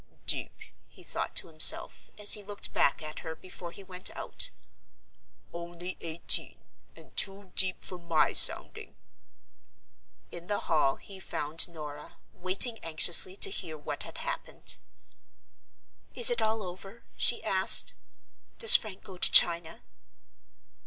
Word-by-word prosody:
"Deep!" - - -1 0.3
he - - -18
thought - - -7
to - - -1
himself, - - +1
as 210 -1 +3
he 210 - -3
looked 205 0 -6
back 140 - -1
at 155 0 -9
her 160 -1 -9
before 180 -1 -12
he 200 - -14
went 185 -1 -3
out; - - -4 1.0
"only 170 +1 -9
eighteen; 165 0 +1 0.4
and - - -20
too 195 -1 -2
deep 185 -1 +1
for 180 - -9
my 165 -3 -1
sounding!" - - 0 1.4
In 175 0 -11
the 205 - -3
hall 150 -4 -1
he 195 -1 -12
found 160 -2 -2
Norah, 150 -3 -12 0.2
waiting 195 +6 0
anxiously 165 +3 +4
to 195 - 0
hear 165 -5 -7
what 150 - -8
had - - -8
happened. - - -5 1.4
"Is 480 +1 +6
it 480 - -2
all 220 0 -2
over?" 195 +5 -12
she 240 - 0
asked. 190 -3 +4 0.6
"Does 460 - +8
Frank 205 -4 -1
go 185 -2 -13
to - - +5
China?" 170 -1 +4
185 Hz, 135 wpm, -27 LUFS, 165-200 Hz, 1.4 s, Does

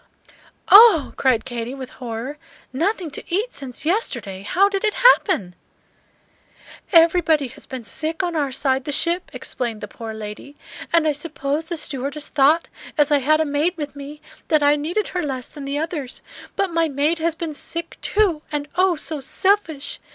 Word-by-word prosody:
"Oh!" 405 -7 +8
cried 255 -4 +2
Katy, 240 0 -4
with 260 -2 -8
horror, 245 +5 -5 0.3
"nothing 350 +3 -1
to - - -6
eat 425 +8 -1
since 270 0 -6
yesterday! 240 - -1
How 370 - +3
did 395 -1 -2
it 425 -1 +1
happen?" 390 - +4 1.4
"Everybody 330 -5 +4
has - - -14
been 260 -3 -6
sick 315 - -3
on 350 -2 -2
our 285 -3 0
side 265 0 0
the 290 - -3
ship," 340 +5 +2
explained 235 -4 -4
the 210 - -6
poor 225 +1 -8
lady, 215 +6 -8 0.4
"and 330 -2 +3
I - - +4
suppose 295 0 -3
the 340 0 -4
stewardess 285 0 -3
thought, 300 +4 +3 0.3
as 295 0 +3
I 290 - +5
had 310 +4 +3
a - - +1
maid 300 +5 0
with 295 -2 -5
me, 285 +1 -9 0.2
that 310 -2 +3
I 290 +1 +5
needed 340 +8 -2
her 360 - -2
less 265 -5 -4
than 285 -2 -9
the 280 +1 -2
others. 300 -4 -4 0.3
But 385 -3 -1
my 330 -1 +2
maid 295 +4 0
has 330 0 0
been 325 -2 -4
sick, 335 +3 -6
too; 390 -8 +1
and 295 -1 -3
oh, 365 0 +3
so 310 0 -4
selfish! 325 -2 0
300 Hz, 175 wpm, -21 LUFS, 270-335 Hz, 1.4 s, Oh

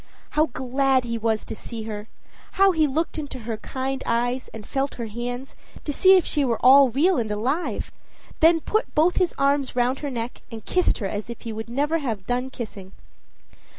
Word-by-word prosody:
How 310 +1 +3
glad 265 +1 +1
he 230 -1 -3
was 220 -1 0
to - - -6
see 225 0 -7
her! 215 -1 -6 0.5
How 390 0 +5
he 315 -3 +2
looked 315 +3 -2
into 290 -3 -6
her 225 -1 -4
kind 265 +4 -4
eyes 245 +2 0
and 220 -2 -10
felt 275 +3 -2
her 235 - -4
hands, 245 +4 -5 0.3
to 295 - -3
see 380 +5 +6
if 360 - +1
she 295 - +1
were 235 -4 +1
all 270 +1 +8
real 325 +10 +2
and 225 -2 -2
alive! 255 +11 -2 0.5
then 325 0 +5
put 435 +8 -1
both 330 +4 +3
his 365 -2 +1
arms 275 -1 +1
round 250 +2 +1
her 290 - -3
neck, 235 -2 -5
and 225 -2 -8
kissed 365 -1 +2
her 200 - -2
as 205 +3 -5
if 235 - -7
he 230 - -5
would 220 +1 -6
never 295 +6 0
have 225 -10 -3
done 250 +1 -1
kissing. 210 -7 -8
260 Hz, 200 wpm, -24 LUFS, 230-295 Hz, 0.5 s, all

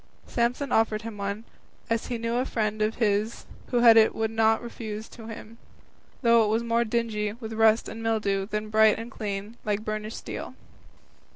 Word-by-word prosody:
Samson 245 +4 -1
offered 220 -1 +2
him 220 -2 -7
one, 200 +2 -3 0.4
as 230 -1 -1
he 240 - -2
knew 230 +1 -1
a 250 - +2
friend 215 -3 -1
of 215 +1 +1
his 215 0 0 0.2
who 245 -1 +1
had 230 -2 +8
it 220 0 +5
would 220 0 -1
not 225 0 +2
refuse 220 -2 -6
it - - -18
to 225 -2 -11
him, 225 +1 -10 0.6
though 235 -1 +6
it - - +1
was 220 +2 +1
more 235 0 +2
dingy 215 -2 -1
with 225 -1 -7
rust 220 0 +4
and 225 - -7
mildew 205 -4 0
than 210 0 -4
bright 220 0 +5
and 230 +2 -7
clean 210 0 -5
like 210 0 -2
burnished 215 0 -4
steel. - - -7
220 Hz, 190 wpm, -26 LUFS, 215-230 Hz, 0.6 s, had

